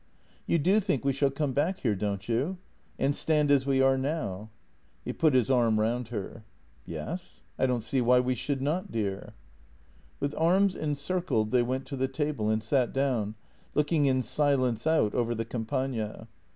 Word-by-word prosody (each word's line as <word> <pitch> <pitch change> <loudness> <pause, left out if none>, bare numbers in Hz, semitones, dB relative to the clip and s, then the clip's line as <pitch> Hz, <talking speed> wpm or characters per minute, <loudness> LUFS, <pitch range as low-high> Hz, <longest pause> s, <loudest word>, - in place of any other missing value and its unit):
"You - - +3
do 185 +7 +3
think 140 - -1
we 140 - +2
shall 140 +1 +2
come 140 0 -2
back 165 +8 0
here, 115 -5 +1
don't 100 0 -3
you? 135 +11 0 0.4
And 140 +1 +1
stand 150 -2 +2
as 140 -1 +3
we 135 -1 +3
are 135 0 +4
now." 120 - -3 0.6
He - - -3
put 155 -4 +2
his 130 +1 +3
arm 115 -4 +3
round 115 +2 0
her. 110 0 -6 0.2
" - - -34
Yes; 175 +3 -6 0.2
I 130 - +3
don't 125 -3 -1
see 130 +3 0
why 125 +1 +5
we 125 +1 +1
should 130 +2 -2
not, 160 +6 -1
dear." 100 -4 -3 0.8
With 140 +1 -2
arms 185 +4 +3
encircled 145 -6 -1
they 125 -1 +4
went 130 +2 -2
to 140 - -6
the 130 0 0
table 135 -5 -2
and 110 0 0
sat 125 +2 +1
down, 125 -6 0 0.4
looking 150 -1 +2
in 130 -1 +2
silence 130 -4 +1
out 155 -10 +3
over 120 -1 0
the 115 0 -3
Campagna. 115 -1 -3
130 Hz, 180 wpm, -28 LUFS, 115-145 Hz, 0.8 s, why